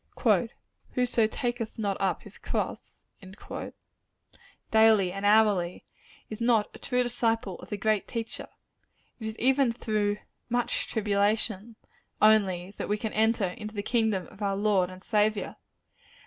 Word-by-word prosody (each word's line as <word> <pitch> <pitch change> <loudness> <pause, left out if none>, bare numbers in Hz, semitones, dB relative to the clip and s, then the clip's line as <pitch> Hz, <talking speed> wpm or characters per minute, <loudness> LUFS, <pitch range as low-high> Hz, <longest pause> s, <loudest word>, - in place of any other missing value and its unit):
"Whoso 245 -3 +2
taketh 240 0 -3
not 200 -3 -1
up 190 -4 0
his 205 - -13
cross," - - -4 1.7
daily 220 -4 +5
and 195 +1 -5
hourly, 205 -5 +3 0.4
is 215 +1 -8
not 230 -3 +2
a - - -11
true 250 -1 +1
disciple 225 -5 -1
of - - -12
the 210 - -3
great 215 0 +1
Teacher. 230 -2 -5 0.7
It 220 - -5
is 220 0 -6
even 265 0 +3
through 215 -3 -1 0.3
"much 245 0 0
tribulation" 210 0 0 0.4
only, 195 -4 +3
that - - -4
we 210 - +1
can 220 0 -4
enter 220 -3 +2
into 215 +4 -8
the 205 - -2
kingdom 220 -6 +1
of 210 - -16
our 200 -1 0
Lord 200 -3 +2
and 185 +1 -11
Saviour. 215 -1 0
215 Hz, 135 wpm, -28 LUFS, 200-225 Hz, 1.7 s, daily